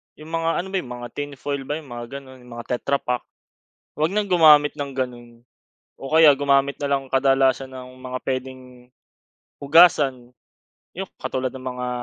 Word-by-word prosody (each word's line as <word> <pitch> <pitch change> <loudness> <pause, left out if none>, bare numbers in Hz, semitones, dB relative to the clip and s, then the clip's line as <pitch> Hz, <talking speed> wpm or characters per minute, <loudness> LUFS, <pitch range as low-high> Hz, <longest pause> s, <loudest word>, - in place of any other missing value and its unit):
yung 155 +1 -12
mga, 165 0 0
ano 190 - -9
ba 195 - 0
yung 125 -6 -7
mga 120 0 -7
tin 145 -1 -6
foil 140 0 -5
ba 150 - -2
yung 140 - -16
mga 120 0 -6 0.2
ganon 130 -1 -15
mga 120 0 -5
tetra 140 +2 -1
pak. 125 -1 -3 0.7
'Wag 160 +6 0
ng 205 -2 -1
gumamit 150 -4 +6
ng 140 -2 -5
ganun 120 -2 -6 0.5
o 135 - -9
kaya 155 -2 +7
gumamit 140 0 +2
na 145 - -1
lang 135 -1 0
kadalasan 135 0 +2
ng 130 -1 -9
mga 130 0 -5
pwedeng 130 0 -3 1.0
hugasan 140 -5 +4 0.7
yung - - -5
katulad 130 -1 -2
ng 130 -1 -9
mga, 125 0 -4
135 Hz, 170 wpm, -22 LUFS, 130-145 Hz, 1.0 s, kaya